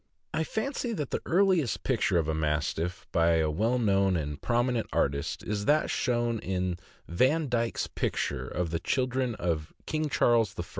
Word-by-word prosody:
I 160 Hz, -, +1 dB
fancy 240 Hz, -, -2 dB
that 150 Hz, -, -3 dB
the -, -, -1 dB
earliest 170 Hz, -, +2 dB
picture 110 Hz, -8 st, +1 dB
of 80 Hz, -2 st, +1 dB
a 80 Hz, -, 0 dB
Mastiff, 80 Hz, +3 st, -1 dB
by 85 Hz, 0 st, +3 dB
a 80 Hz, -1 st, +2 dB
well 110 Hz, +10 st, +1 dB
known 100 Hz, -5 st, +2 dB
and 75 Hz, -2 st, -4 dB
prominent 120 Hz, -1 st, +1 dB
artist, 70 Hz, 0 st, -1 dB
is 105 Hz, -1 st, -2 dB
that 150 Hz, +1 st, +3 dB
shown 120 Hz, -2 st, 0 dB
in 90 Hz, -3 st, -2 dB, 0.3 s
Vandyke's 125 Hz, -, +1 dB
picture -, -, -2 dB
of 90 Hz, -2 st, -2 dB
the 85 Hz, -, -1 dB
children 130 Hz, -2 st, 0 dB
of 80 Hz, -4 st, -2 dB
King 155 Hz, -1 st, -1 dB
Charles 115 Hz, -6 st, +3 dB
I. -, -, -2 dB
110 Hz, 160 wpm, -29 LUFS, 85-130 Hz, 0.3 s, by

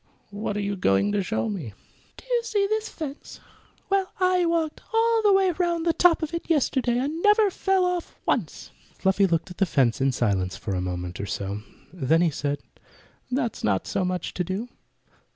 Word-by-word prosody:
"What 205 Hz, 0 st, -3 dB
are -, -, -1 dB
you 200 Hz, 0 st, -2 dB
going 95 Hz, -, +2 dB
to 205 Hz, -1 st, +1 dB
show 220 Hz, +4 st, -1 dB
me?" 170 Hz, -, -5 dB, 0.4 s
"Do -, -, -14 dB
you -, -, +1 dB
see 420 Hz, -3 st, +1 dB
this 435 Hz, +2 st, -1 dB
fence? 295 Hz, -3 st, -7 dB, 0.5 s
Well, 390 Hz, -1 st, +1 dB
I 365 Hz, -1 st, +3 dB
walked 330 Hz, -2 st, -1 dB
all 455 Hz, 0 st, +3 dB
the 420 Hz, -2 st, +4 dB
way 385 Hz, -1 st, +4 dB
round 345 Hz, -1 st, 0 dB
on -, -, -3 dB
the 335 Hz, -1 st, +2 dB
top 345 Hz, -1 st, +4 dB
of 315 Hz, +1 st, -3 dB
it 335 Hz, -, -4 dB
yesterday, 260 Hz, -5 st, +2 dB
and 295 Hz, +6 st, -2 dB
never 420 Hz, 0 st, +5 dB
fell 380 Hz, 0 st, +1 dB
off 360 Hz, -1 st, -2 dB
once." -, -, -2 dB, 0.3 s
Fluffy 190 Hz, +1 st, +3 dB
looked 170 Hz, +1 st, -1 dB
at 180 Hz, -, -11 dB
the 195 Hz, -, +3 dB
fence 130 Hz, -6 st, +2 dB
in 135 Hz, 0 st, +3 dB
silence 100 Hz, -7 st, 0 dB
for 100 Hz, -, -4 dB
a 90 Hz, -, -1 dB
moment 90 Hz, -1 st, -4 dB
or 100 Hz, -, -4 dB
so. 100 Hz, +1 st, -3 dB, 0.3 s
Then 160 Hz, -1 st, +2 dB
he 170 Hz, -2 st, +3 dB
said, 145 Hz, 0 st, -2 dB, 0.7 s
"That's 245 Hz, -3 st, -2 dB
not 100 Hz, -3 st, +1 dB
so -, -, -1 dB
much 180 Hz, -1 st, -2 dB
to 180 Hz, -, -1 dB
do." 190 Hz, +7 st, -4 dB
230 Hz, 200 wpm, -25 LUFS, -, 0.7 s, never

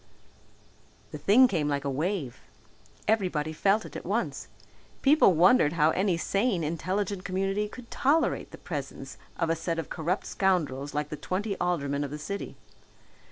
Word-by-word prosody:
The -, -, -6 dB
thing 250 Hz, +6 st, +6 dB
came 165 Hz, -10 st, -1 dB
like 140 Hz, -1 st, -1 dB
a -, -, 0 dB
wave. 150 Hz, -2 st, -2 dB, 0.7 s
Everybody 180 Hz, -8 st, 0 dB
felt 200 Hz, +6 st, +2 dB
it -, -, -11 dB
at -, -, -6 dB
once. -, -, -2 dB, 0.6 s
People 280 Hz, -8 st, +6 dB
wondered 170 Hz, -1 st, +5 dB
how 160 Hz, -1 st, +3 dB
any 185 Hz, -1 st, +1 dB
sane, 195 Hz, 0 st, 0 dB
intelligent 185 Hz, +5 st, -2 dB
community 195 Hz, +2 st, -1 dB
could 240 Hz, +1 st, -12 dB
tolerate 305 Hz, +4 st, +1 dB
the -, -, -11 dB
presence 140 Hz, -4 st, -6 dB, 0.2 s
of 165 Hz, -1 st, 0 dB
a -, -, +2 dB
set 165 Hz, +1 st, -3 dB
of 165 Hz, -, -5 dB
corrupt 175 Hz, +4 st, -2 dB
scoundrels 145 Hz, -8 st, 0 dB
like 150 Hz, 0 st, -1 dB
the 150 Hz, -, -5 dB
twenty 200 Hz, +5 st, -2 dB
aldermen 145 Hz, -5 st, 0 dB
of 145 Hz, -, -4 dB
the 150 Hz, -, -5 dB
city. 200 Hz, +7 st, -5 dB
175 Hz, 160 wpm, -28 LUFS, 150-200 Hz, 0.7 s, thing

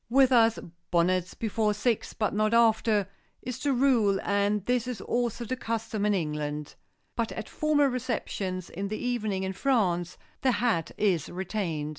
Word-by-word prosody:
With 265 Hz, +1 st, +5 dB
us 230 Hz, -2 st, +5 dB, 0.3 s
"Bonnets 180 Hz, +1 st, +1 dB
before 215 Hz, -1 st, 0 dB
six 230 Hz, +1 st, 0 dB
but 215 Hz, -2 st, -1 dB
not 215 Hz, +2 st, +2 dB
after" 220 Hz, -3 st, +3 dB, 0.4 s
is 250 Hz, -1 st, -5 dB
the 290 Hz, -, 0 dB
rule, 240 Hz, -7 st, +3 dB
and 200 Hz, 0 st, +1 dB
this 250 Hz, -1 st, +1 dB
is 250 Hz, -5 st, -4 dB
also 240 Hz, +1 st, -1 dB
the 255 Hz, -, -2 dB
custom 225 Hz, -3 st, -2 dB
in 205 Hz, -, +3 dB
England. 150 Hz, -3 st, -3 dB, 0.4 s
But 230 Hz, -2 st, -1 dB
at 220 Hz, -, -6 dB
formal 305 Hz, -2 st, +2 dB
receptions 220 Hz, -8 st, -3 dB
in 195 Hz, +3 st, -4 dB
the 215 Hz, +2 st, -3 dB
evening 215 Hz, -6 st, -1 dB
in 190 Hz, 0 st, -2 dB
France 180 Hz, -7 st, 0 dB, 0.2 s
the 260 Hz, -2 st, +3 dB
hat 210 Hz, -7 st, +1 dB
is 185 Hz, -8 st, +1 dB
retained. 175 Hz, -5 st, -3 dB
215 Hz, 160 wpm, -28 LUFS, 190-240 Hz, 0.4 s, With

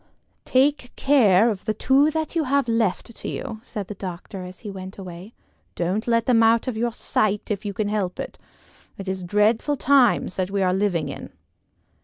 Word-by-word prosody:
"Take 260 Hz, -1 st, +2 dB
care 230 Hz, -6 st, +4 dB
of 200 Hz, -2 st, -6 dB
the 215 Hz, -1 st, -1 dB
two 275 Hz, +3 st, +4 dB
that 315 Hz, +1 st, -3 dB
you 320 Hz, -2 st, +1 dB
have 275 Hz, 0 st, +1 dB
left 225 Hz, -1 st, 0 dB
to -, -, -6 dB
you," 225 Hz, -5 st, -5 dB
said 210 Hz, -4 st, -6 dB
the -, -, -5 dB
doctor 185 Hz, 0 st, -7 dB
as 180 Hz, 0 st, -11 dB
he 210 Hz, -, -6 dB
went 190 Hz, 0 st, -8 dB
away. 185 Hz, +2 st, -9 dB, 0.4 s
"Don't 185 Hz, +7 st, -1 dB
let 230 Hz, -1 st, +2 dB
them 240 Hz, -3 st, +4 dB
out 230 Hz, +2 st, +4 dB
of 255 Hz, -, -2 dB
your 235 Hz, +2 st, 0 dB
sight 215 Hz, -2 st, -1 dB
if 210 Hz, +1 st, -3 dB
you 200 Hz, -, -3 dB
can 215 Hz, -, -1 dB
help 205 Hz, -4 st, -2 dB
it. -, -, -6 dB, 0.6 s
It 195 Hz, -, -8 dB
is 190 Hz, 0 st, -2 dB
dreadful 210 Hz, +9 st, +2 dB
times 265 Hz, -8 st, +3 dB
that 185 Hz, -1 st, -1 dB
we 195 Hz, -1 st, 0 dB
are 185 Hz, -1 st, +2 dB
living 185 Hz, -6 st, 0 dB
in." 140 Hz, -, -7 dB
215 Hz, 195 wpm, -23 LUFS, 190-240 Hz, 0.6 s, care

